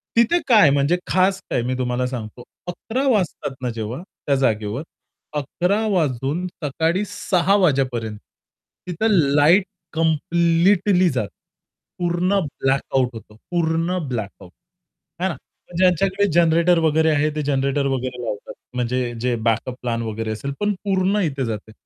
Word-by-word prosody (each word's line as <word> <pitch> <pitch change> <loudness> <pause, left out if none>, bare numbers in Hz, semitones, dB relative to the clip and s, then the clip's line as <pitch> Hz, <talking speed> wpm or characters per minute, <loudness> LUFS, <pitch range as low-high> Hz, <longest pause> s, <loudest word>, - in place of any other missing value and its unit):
तिथे 235 +10 +4
काय 215 - +7
म्हणजे 140 +5 +2
खास 190 +1 +2
काय? - - 0
मी 125 +1 -2
तुम्हाला 125 0 -1
सांगतो. 120 -1 -7 0.2
11:00 245 +9 -2
वाजतात 180 - -1
ना 125 - -1
जेव्हा 115 +6 -4
त्या 140 -6 -3
जागेवर, 110 -1 0 0.5
11:00 180 +9 0
वाजून 150 -1 0 0.2
सकाळी 160 +7 0
6:00 195 -1 +1
वाजेपर्यंत, 130 - +1 0.7
तिथं 215 +6 0 0.2
लाईट 165 +7 +5 0.3
कंप्लीटली 170 +4 +3
जाते. 125 -7 -2 0.7
पूर्ण 175 +3 +1 0.2
ब्लॅकआउट 135 -1 +1
होतो, 110 -1 -11 0.2
पूर्ण 170 +1 0
ब्लॅकआउट, 100 -6 -6 0.7
आहे 190 +1 0
ना. 170 - -4 0.4
ज्यांच्याकडे 190 +2 +3
जनरेटर 170 +1 +4
वगैरे 160 0 +3
आहे 150 0 +2
ते 155 - -1
जनरेटर 140 0 0
वगैरे 130 -2 -3
लावतात 105 -3 -5 0.2
म्हणजे 125 0 0 0.2
जे 125 -1 +1
बॅकअप 115 +2 0
प्लॅन 115 -2 -2
वगैरे 110 0 -3
असेल, 140 +6 -4
पण 205 0 +1
पूर्ण 195 +1 +1
इथे 135 -3 -3
जाते. 110 -1 -5
150 Hz, 130 wpm, -21 LUFS, 125-180 Hz, 0.7 s, काय